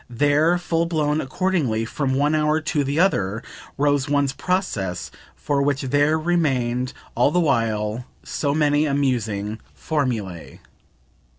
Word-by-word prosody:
There, 145 Hz, +7 st, +3 dB
full 170 Hz, -1 st, 0 dB
blown, 155 Hz, -2 st, 0 dB
accordingly, 135 Hz, -, 0 dB
from 130 Hz, +2 st, -1 dB
one 145 Hz, +3 st, +2 dB
hour 155 Hz, 0 st, +2 dB
to 155 Hz, -2 st, -1 dB
the 140 Hz, +3 st, -1 dB
other, 110 Hz, -, +1 dB, 0.3 s
rose 145 Hz, 0 st, +1 dB
one's 140 Hz, -2 st, +1 dB
process 120 Hz, -, -2 dB, 0.2 s
for 145 Hz, -1 st, -1 dB
which 140 Hz, 0 st, +1 dB
there 145 Hz, +4 st, +2 dB
remained 130 Hz, -7 st, 0 dB, 0.2 s
all 120 Hz, +4 st, +3 dB
the 175 Hz, +4 st, +1 dB
while 115 Hz, -6 st, 0 dB, 0.2 s
so 145 Hz, -1 st, -1 dB
many 150 Hz, 0 st, +2 dB
amusing 115 Hz, -7 st, -1 dB, 0.2 s
formulae. 115 Hz, -, -3 dB
145 Hz, 125 wpm, -22 LUFS, 120-155 Hz, 0.3 s, There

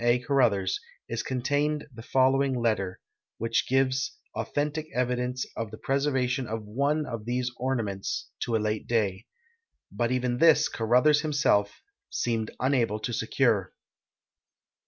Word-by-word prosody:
A. 120 Hz, +1 st, +4 dB
Caruthers, 120 Hz, -8 st, +2 dB, 0.3 s
is 115 Hz, 0 st, -2 dB
contained 145 Hz, +4 st, 0 dB
the 115 Hz, -, -9 dB
following 130 Hz, +1 st, +2 dB
letter, 105 Hz, -6 st, 0 dB, 0.4 s
which 115 Hz, +1 st, 0 dB
gives 130 Hz, 0 st, +1 dB, 0.2 s
authentic 150 Hz, +2 st, -2 dB
evidence 125 Hz, 0 st, 0 dB
of 115 Hz, -2 st, -3 dB
the 110 Hz, -, -10 dB
])reservation 135 Hz, -2 st, +1 dB
of 110 Hz, 0 st, -4 dB
one 140 Hz, +8 st, 0 dB
of 115 Hz, -5 st, -6 dB
these 125 Hz, +1 st, -1 dB
ornaments 115 Hz, -7 st, -2 dB
to 115 Hz, -, -1 dB
a -, -, +5 dB
late 105 Hz, 0 st, -2 dB
da}'. 105 Hz, -2 st, 0 dB, 0.6 s
But 120 Hz, 0 st, -1 dB
even 125 Hz, -1 st, 0 dB
this 160 Hz, -2 st, +6 dB
Caruthers 125 Hz, +7 st, +3 dB
himself 140 Hz, -9 st, +1 dB, 0.3 s
seemed 115 Hz, -2 st, -1 dB
unable 125 Hz, -5 st, +1 dB
to 120 Hz, +2 st, -3 dB
secure. -, -, +1 dB
125 Hz, 130 wpm, -27 LUFS, 115-135 Hz, 0.6 s, this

